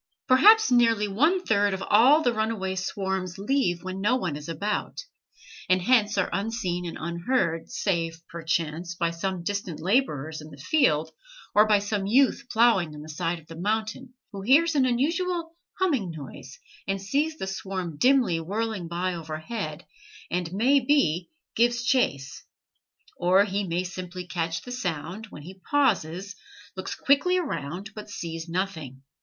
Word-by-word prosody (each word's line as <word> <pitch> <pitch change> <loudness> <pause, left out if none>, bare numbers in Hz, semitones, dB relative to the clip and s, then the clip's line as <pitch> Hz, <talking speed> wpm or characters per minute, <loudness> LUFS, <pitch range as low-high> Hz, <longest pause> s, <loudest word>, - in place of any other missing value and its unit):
Perhaps 420 +10 +6
nearly 230 -4 +4
one 310 - +2
third 205 -2 +2
of 190 - -6
all 265 +9 +6
the 245 - +2
runaway 220 -4 -1
swarms 190 -1 -3
leave 200 -5 0
when 185 +1 -5
no 220 +5 +3
one 180 - -2
is 150 +2 -8
about, 200 +6 -3 0.7
and 185 0 +4
hence 210 0 +3
are 190 - +1
unseen 195 -5 -2
and 165 - -6
unheard, 170 0 -1
save, 165 -4 -1
perchance, 170 0 -3
by 170 -1 0
some 180 +1 -3
distant 200 -4 -3
laborers 160 - 0
in 155 - -11
the 145 - -13
field, 160 - +2 0.4
or 210 +1 +6
by 210 -1 +5
some 205 -1 -2
youth 270 +4 +3
ploughing 195 -9 +3
on 150 - -9
the 155 - -11
side 165 +3 -2
of 160 - -15
the 165 - -11
mountain, 220 +7 -3 0.2
who 200 - -7
hears 295 +10 +4
an 270 -3 +3
unusual 330 +6 -1 0.2
humming 290 - +1
noise, 160 - -9 0.3
and 195 0 -1
sees 285 +11 -1
the - - -4
swarm 190 -3 -4
dimly 250 - +3
whirling 200 +1 -3
by 180 +2 -2
overhead, 160 +1 -5 0.5
and, 175 -1 -2
may 250 +9 +3
be, 210 - +1 0.3
gives 240 +1 +2
chase; 140 - 0 0.7
or 185 +3 +4
he 200 -1 -2
may 175 +2 -1
simply 180 0 -6
catch 165 -2 -3
the 245 - -9
sound, 180 -2 -4
when 150 - -11
he 185 +4 -12
pauses, 200 - +1 0.4
looks - - -5
quickly 285 +7 +3
around, 195 - -4
but 210 -1 -9
sees 165 -3 -6
nothing. 160 -8 -4
195 Hz, 155 wpm, -26 LUFS, 170-240 Hz, 0.7 s, Perhaps